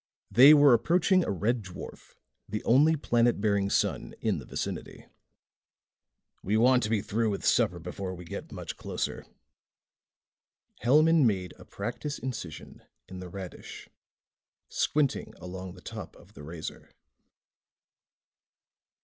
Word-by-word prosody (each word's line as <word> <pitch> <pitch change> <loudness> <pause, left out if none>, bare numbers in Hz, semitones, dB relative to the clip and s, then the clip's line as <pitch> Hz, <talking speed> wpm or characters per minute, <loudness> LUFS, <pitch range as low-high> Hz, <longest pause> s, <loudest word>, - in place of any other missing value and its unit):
They 130 +8 +9
were 145 -3 +7
approaching 175 - +3
a - - -3
red 110 +5 0
dwarf, 95 -2 -11 0.3
the 105 - -4
only 150 +7 +4
planet 120 -5 +1
bearing 100 -1 +1
sun - - -1
in - - 0
the - - -10
vicinity. - - -5 1.4
"We 105 +4 0
want 125 +2 +5
to 105 - -2
be 110 -2 +1
through 115 +1 0
with 100 - -4
supper 90 - +3
before 90 +2 -6
we 90 0 -10
get 80 - -7
much - - -7
closer." - - -4 1.5
Hellman 155 +3 +5
made 95 -4 -2
a - - -13
practice 120 +8 -5
incision 110 - -7 0.3
in 95 - -8
the 90 -1 -8
radish, 95 0 -9 0.8
squinting 145 -3 0
along 90 0 -8
the 90 - -14
top - - -8
of - - -19
the 70 - -12
razor. 80 +2 -8
110 Hz, 130 wpm, -28 LUFS, 95-130 Hz, 1.5 s, They